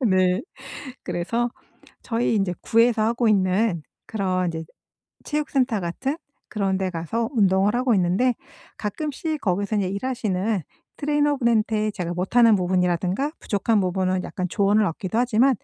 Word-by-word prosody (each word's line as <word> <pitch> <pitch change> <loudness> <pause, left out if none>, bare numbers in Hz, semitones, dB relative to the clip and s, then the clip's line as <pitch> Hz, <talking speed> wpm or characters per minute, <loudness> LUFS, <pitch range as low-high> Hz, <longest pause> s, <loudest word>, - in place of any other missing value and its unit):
네. 185 +2 +3 0.6
그래서 210 +8 -1 0.5
저희 230 -1 0
인제 195 -3 +1
구에서 230 0 +3
하고 235 +2 +1
있는 190 -3 +2 0.2
그런 185 -4 -1
인제 160 -1 -3 0.6
체육 300 -1 -2
센터 255 -5 +1
같은 255 - -2 0.3
그런 195 -3 0
데 190 -1 -1
가서 185 +7 -2
운동을 200 -1 +3
하고 250 0 +2
있는데 190 +7 +2 0.4
가끔씩 300 +7 -3
거기서 200 +2 0
인제 195 -2 +1
일하시는 205 -3 -1 0.3
트레이너 295 -1 +1
분한테 220 -3 +1
제가 175 -4 -4
못하는 220 +6 +4
부분이라든가 180 - 0
부족한 210 +1 +1
부분은 185 0 0
약간 185 -1 -3
조언을 205 +2 +3
얻기도 185 +5 -3
하지만 245 +2 +3
210 Hz, 325 characters per minute, -24 LUFS, 185-235 Hz, 0.6 s, 못하는